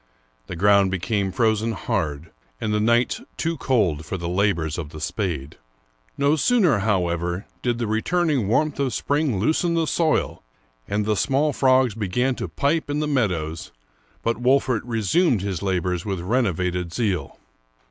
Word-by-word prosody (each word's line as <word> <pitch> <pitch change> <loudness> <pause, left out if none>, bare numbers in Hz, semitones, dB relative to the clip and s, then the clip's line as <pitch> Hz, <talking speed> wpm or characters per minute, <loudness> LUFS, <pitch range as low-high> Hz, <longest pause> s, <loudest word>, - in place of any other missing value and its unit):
The - - -6
ground 100 +2 +4
became 95 +2 -1
frozen 110 +1 +1
hard, 80 -4 -3 0.3
and 105 - -1
the 105 - +2
nights 120 +3 +2 0.2
too 165 0 -1
cold 100 - +1
for 80 +5 -4
the 85 -1 -4
labors 85 -4 0
of 75 -4 -5
the 80 0 -9
spade. 75 -4 -3 0.6
No 140 +2 +3
sooner, 175 - +3
however, 90 -2 -1 0.2
did 120 -2 0
the 120 - -2
returning 135 - 0
warmth 150 +7 +1
of 135 -3 0
spring 145 -6 0
loosen 160 - +1
the 165 -1 +2
soil, 160 0 0 0.5
and 105 +1 -1
the 105 0 +1
small 140 +7 +1
frogs 130 -3 +3
begin 115 +5 0
to - - -3
pipe 150 +2 -1
in 145 +1 -1
the 150 - -1
meadows, 90 - -1 0.5
but 115 +1 -1
Wolfert 130 -2 +2
resumed 120 - +1
his 95 -4 -3
labors 90 -2 -1
with 95 -3 -3
renovated 90 -4 -1
zeal. 95 -4 -2
105 Hz, 155 wpm, -23 LUFS, 90-130 Hz, 0.6 s, ground